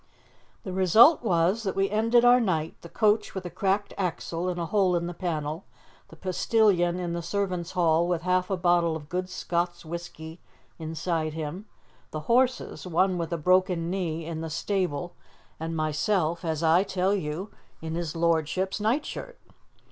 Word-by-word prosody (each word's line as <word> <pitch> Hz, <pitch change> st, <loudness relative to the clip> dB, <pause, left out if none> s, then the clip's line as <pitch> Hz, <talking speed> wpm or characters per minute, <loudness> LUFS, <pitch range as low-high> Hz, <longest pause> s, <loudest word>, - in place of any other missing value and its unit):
The 185 Hz, -, -5 dB
result 215 Hz, -, +6 dB
was 185 Hz, +1 st, +2 dB
that 195 Hz, -4 st, -3 dB
we 195 Hz, 0 st, +2 dB
ended 230 Hz, +3 st, +3 dB
our 245 Hz, +1 st, +7 dB
night, 165 Hz, -8 st, 0 dB
the 170 Hz, -, -11 dB
coach 215 Hz, +1 st, +1 dB
with 190 Hz, -1 st, -5 dB
a 175 Hz, -, -5 dB
cracked 195 Hz, +3 st, -1 dB
axle 175 Hz, -1 st, -2 dB
and 175 Hz, -1 st, -3 dB
a 170 Hz, -, -1 dB
hole 185 Hz, 0 st, +2 dB
in 170 Hz, 0 st, -1 dB
the 175 Hz, -, -4 dB
panel, 160 Hz, -1 st, -3 dB, 0.4 s
the -, -, -14 dB
postilion 185 Hz, 0 st, +2 dB
in 175 Hz, -1 st, -3 dB
the 170 Hz, -, -3 dB
servants' 180 Hz, -1 st, -2 dB
hall 170 Hz, -1 st, +3 dB
with 175 Hz, -2 st, -1 dB
half 180 Hz, 0 st, +1 dB
a 195 Hz, -, 0 dB
bottle 175 Hz, -2 st, +2 dB
of 150 Hz, -2 st, -8 dB
good 180 Hz, +1 st, -3 dB
Scots 175 Hz, -1 st, -2 dB
whisky 165 Hz, 0 st, -8 dB, 0.4 s
inside 160 Hz, 0 st, -2 dB
him, 160 Hz, +6 st, -5 dB, 0.4 s
the 155 Hz, -, -5 dB
horses 250 Hz, +1 st, +1 dB
one 180 Hz, +1 st, +1 dB
with 165 Hz, 0 st, -3 dB
a 170 Hz, -, 0 dB
broken 180 Hz, 0 st, +2 dB
knee 165 Hz, -4 st, -2 dB
in 160 Hz, -1 st, -5 dB
the 165 Hz, -, -4 dB
stable, 175 Hz, -1 st, -2 dB, 0.5 s
and 165 Hz, +1 st, -4 dB
myself, 160 Hz, +2 st, 0 dB
as 160 Hz, -1 st, -2 dB
I 165 Hz, +3 st, +5 dB
tell 190 Hz, 0 st, 0 dB
you, 185 Hz, +1 st, -3 dB, 0.3 s
in 160 Hz, 0 st, -5 dB
his 170 Hz, -2 st, -3 dB
lordship's 170 Hz, +4 st, 0 dB
nightshirt. 290 Hz, -, -2 dB
175 Hz, 170 wpm, -27 LUFS, 165-195 Hz, 0.5 s, our